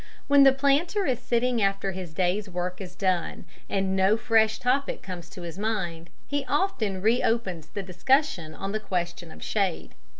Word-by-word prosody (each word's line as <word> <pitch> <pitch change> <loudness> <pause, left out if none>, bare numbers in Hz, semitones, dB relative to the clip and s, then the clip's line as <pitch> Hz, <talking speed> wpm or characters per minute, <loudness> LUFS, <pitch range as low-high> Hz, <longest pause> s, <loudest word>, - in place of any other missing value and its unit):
When 285 0 +6
the 270 -1 +8
planter 285 +9 +2
is 255 -4 0
sitting 240 0 +1
after 195 -1 +1
his 185 -3 -6
day's 185 +5 0
work 180 +1 -4
is 180 -1 -8
done, 185 -3 -1 0.2
and 190 -1 0
no 195 +3 +4
fresh 225 -2 +3
topic 265 +3 0
comes 175 -3 -7
to 180 - -9
his 170 +2 -7
mind, 175 -6 -2 0.2
he 285 -1 -2
often 245 - 0
re 230 +3 +3
opens 185 -9 -1
the 200 +4 -5
discussion 185 - +1
on 195 - -4
the 215 - -1
question 175 -4 -3
of - - -10
shade. 195 -5 -1
195 Hz, 175 wpm, -26 LUFS, 180-245 Hz, 0.2 s, the